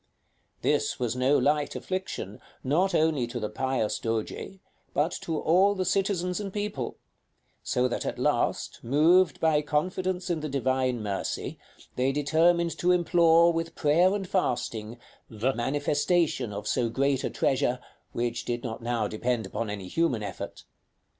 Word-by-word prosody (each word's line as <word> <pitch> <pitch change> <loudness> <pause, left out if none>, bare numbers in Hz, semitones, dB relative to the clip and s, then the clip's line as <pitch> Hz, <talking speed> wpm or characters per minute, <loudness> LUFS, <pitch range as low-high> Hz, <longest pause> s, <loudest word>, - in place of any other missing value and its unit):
This - - +1
was 120 -1 -1
no 130 +3 +3
light 145 0 +1
affliction, 185 - -4 0.2
not 175 +9 +2
only 155 -6 +2
to 120 +1 -5
the 105 -2 -3
pious 130 -1 -1
Doge, 115 - -3 0.4
but 155 +4 +2
to 160 -2 -2
all 190 +5 +4
the 185 -1 -1
citizens 180 -1 0
and 200 -2 -4
people; 205 - -4 0.6
so 125 +1 +1
that 125 - -3
at - - -3
last, - - 0
moved 160 +7 +4
by 155 -2 +3
confidence 180 +5 -1
in 165 - 0
the 155 0 -4
Divine 130 -3 0
mercy, 100 -2 -3 0.4
they 130 +2 +2
determined 165 +3 +2
to 180 - +3
implore, 170 -1 +5
with 165 0 -3
prayer 170 +6 +3
and 195 -2 -3
fasting, 120 - -2 0.3
the 115 +4 -1
manifestation 145 - 0
of 105 +1 -5
so 120 -2 +1
great 135 +2 +1
a - - 0
treasure, 130 -2 +1 0.3
which 120 0 -2
did 120 0 -3
not 115 -2 -5
now 115 -2 -1
depend 115 +1 -1
upon 110 +3 -4
any 100 -3 -5
human 130 - 0
effort. 100 -2 -7
145 Hz, 150 wpm, -27 LUFS, 120-170 Hz, 0.6 s, implore